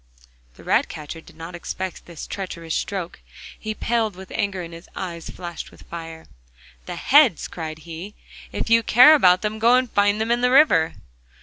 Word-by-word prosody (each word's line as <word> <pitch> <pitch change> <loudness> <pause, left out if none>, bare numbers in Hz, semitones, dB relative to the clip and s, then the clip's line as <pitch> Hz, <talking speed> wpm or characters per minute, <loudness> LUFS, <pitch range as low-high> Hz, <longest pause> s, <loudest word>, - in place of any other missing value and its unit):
The - - -15
ratcatcher 155 +2 -1
did - - -18
not 165 +2 -9
expect 185 +1 -6
this 170 -3 -8
treacherous 170 -4 -6
stroke. 190 -4 -3 0.4
He 215 0 -4
paled 225 -4 -1
with 190 0 -12
anger 195 -3 -2
and 165 0 -9
his 165 +1 -12
eyes 170 -3 -6
flashed 175 -2 -7
fire. 165 -1 -10 0.6
'The - - -5
heads!' 275 - +4
cried 160 -2 -6
he, 170 +5 -8 0.4
'if - - -3
you 230 0 +5
care 250 +7 +7
about 185 -11 +5
them, 215 +1 -2
go 235 +3 +5
and 255 -2 +1
find 205 +1 +2
them 220 +1 -1
in 240 0 +2
the 250 - +3
river. 250 - +4
190 Hz, 175 wpm, -22 LUFS, 170-225 Hz, 0.6 s, care